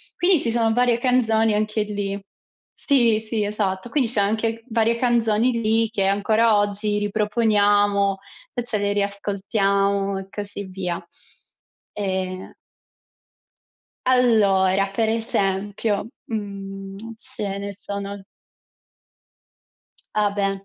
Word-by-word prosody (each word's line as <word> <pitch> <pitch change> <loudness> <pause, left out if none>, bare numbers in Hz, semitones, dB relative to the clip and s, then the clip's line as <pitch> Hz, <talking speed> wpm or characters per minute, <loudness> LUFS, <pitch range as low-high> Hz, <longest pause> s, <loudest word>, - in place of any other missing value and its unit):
Quindi 350 -3 +3
ci 235 - +1
sono 225 -1 +2
varie 245 -1 +3
canzoni 225 -3 +2
anche 215 +1 0
lì. 200 -1 -4 0.5
Sì, 235 -6 +3
sì, 220 -1 -2
esatto. 205 +1 -2
Quindi 255 -5 +1
c'è 215 -4 +3
anche 225 +2 -1
varie 230 0 +2
canzoni 235 -1 +2
lì 225 +1 +2
che 200 -4 -1
ancora 215 +2 +3
oggi 205 +1 0
riproponiamo 205 -2 +2 0.4
e 245 - -1
ce 230 -3 -1
le 205 0 0
riascoltiamo 200 0 0
e 195 - -9
così 205 0 -6
via. 185 -2 -5 0.9
E 190 -2 -4 1.5
Allora, 200 -6 +3
per 220 +2 0
esempio, 205 -1 -1 0.2
mhmm, 195 -2 -6 0.2
ce 210 -5 -1
ne 200 0 -5
sono 200 0 -6 1.9
Ah 210 -1 +2
beh. 195 -1 -2
205 Hz, 110 wpm, -22 LUFS, 200-225 Hz, 1.9 s, Quindi